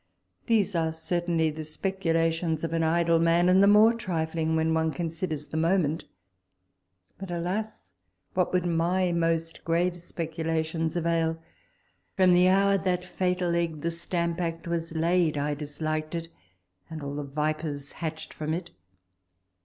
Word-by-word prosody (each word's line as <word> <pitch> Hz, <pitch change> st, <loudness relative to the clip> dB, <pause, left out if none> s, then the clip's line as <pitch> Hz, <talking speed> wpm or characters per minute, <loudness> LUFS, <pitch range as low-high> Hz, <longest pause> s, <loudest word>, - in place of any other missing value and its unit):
These 215 Hz, -4 st, +2 dB
are 165 Hz, -2 st, +1 dB
certainly 165 Hz, 0 st, 0 dB
the 155 Hz, +1 st, -6 dB
speculations 165 Hz, -1 st, -1 dB
of 165 Hz, -, -2 dB
an 165 Hz, -, +1 dB
idle 165 Hz, +1 st, +3 dB
man, 170 Hz, +1 st, +3 dB
and 185 Hz, +1 st, +5 dB
the 200 Hz, -, +6 dB
more 210 Hz, +3 st, +7 dB
trifling 160 Hz, -6 st, -1 dB
when 160 Hz, 0 st, +2 dB
one 160 Hz, 0 st, +2 dB
considers 160 Hz, -2 st, -3 dB
the 160 Hz, -, -4 dB
moment. 165 Hz, -2 st, +1 dB, 1.1 s
But 195 Hz, -1 st, -7 dB
alas! 180 Hz, -, -3 dB, 0.4 s
what 180 Hz, -1 st, +1 dB
would 180 Hz, -1 st, +1 dB
my 175 Hz, +2 st, +1 dB
most 165 Hz, -1 st, -1 dB
grave 170 Hz, +2 st, +1 dB
speculations 165 Hz, -1 st, -2 dB
avail? 165 Hz, -1 st, 0 dB, 0.8 s
From 185 Hz, -1 st, +5 dB
the 180 Hz, +1 st, +5 dB
hour 195 Hz, +1 st, +4 dB
that 180 Hz, -1 st, -1 dB
fatal 180 Hz, -1 st, 0 dB
egg, 165 Hz, -3 st, -1 dB
the 170 Hz, -, -1 dB
Stamp 170 Hz, 0 st, -2 dB
Act, 165 Hz, 0 st, -3 dB
was 165 Hz, -1 st, -2 dB
laid, 165 Hz, -1 st, +2 dB
I 145 Hz, +1 st, 0 dB
disliked 155 Hz, +2 st, -3 dB
it 165 Hz, 0 st, -4 dB, 0.6 s
and 155 Hz, -2 st, -7 dB
all 140 Hz, 0 st, -4 dB
the 145 Hz, 0 st, -3 dB
vipers 150 Hz, 0 st, -3 dB
hatched 160 Hz, -1 st, -6 dB
from 155 Hz, +1 st, -2 dB
it. 175 Hz, 0 st, -6 dB
165 Hz, 145 wpm, -27 LUFS, 160-180 Hz, 1.1 s, more